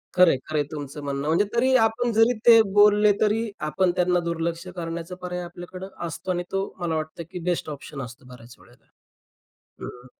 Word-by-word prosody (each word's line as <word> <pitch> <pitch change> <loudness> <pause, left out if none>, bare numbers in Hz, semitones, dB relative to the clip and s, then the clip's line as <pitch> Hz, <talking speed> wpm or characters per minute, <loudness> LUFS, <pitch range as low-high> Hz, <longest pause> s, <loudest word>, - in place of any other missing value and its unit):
खरंय, 180 -6 +6
खरंय, 155 -1 0
तुमचं 145 -1 -7
म्हणणं. 140 0 -3
म्हणजे 165 +6 +3
तरी 260 +2 +3
आपण 235 +2 0
जरी 225 +3 +4
ते 230 -1 +9
बोलले 210 0 +6
तरी 220 +2 +1 0.2
आपण 180 +4 +2
त्यांना 180 -1 +2
दुर्लक्ष 170 +1 -3
करण्याचा 170 +1 -5
पर्याय 180 0 -4
आपल्याकडं 175 +2 -9 0.2
असतो 170 +3 -5
आणि 175 0 -1
तो 195 0 0
मला 170 -2 -1
वाटतं 155 +2 -4
की 180 - -6
बेस्ट 175 -2 -1
ऑप्शन 145 -1 -7
असतो 125 +2 -10
बऱ्याच 120 -1 -13
वेळेला. - - -22 1.0
हं. 125 0 -9
175 Hz, 170 wpm, -24 LUFS, 155-200 Hz, 1.0 s, ते